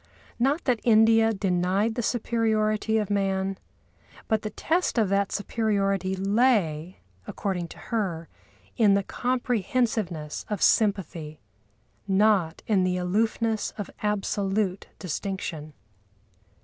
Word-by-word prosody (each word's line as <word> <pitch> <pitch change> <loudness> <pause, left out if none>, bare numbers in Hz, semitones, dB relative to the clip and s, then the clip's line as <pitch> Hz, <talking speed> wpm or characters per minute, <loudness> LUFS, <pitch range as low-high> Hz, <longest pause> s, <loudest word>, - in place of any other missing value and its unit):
Not 275 +7 +1
that 245 -4 +1
India 225 0 +5
denied 195 +2 0
the 240 - -2
superiority 220 -2 0
of 210 -2 -1
man, 195 -1 0 0.7
but 220 -1 +1
the 215 - -4
test 335 +5 -1
of 215 -4 +3
that 200 0 +1
superiority 195 -3 0
lay, 190 -5 +1 0.3
according 180 -4 -3
to - - -13
her, 185 -8 -3 0.5
in 205 -3 +4
the 200 - +1
comprehensiveness 225 - -1
of 210 -3 -2
sympathy, 170 -9 +1 0.7
not 195 -4 +2
in 200 -4 +2
the 180 0 0
aloofness 220 +4 0
of 205 - -5
absolute 200 -1 -1
distinction. 170 -4 -5
205 Hz, 110 wpm, -26 LUFS, 185-220 Hz, 0.7 s, India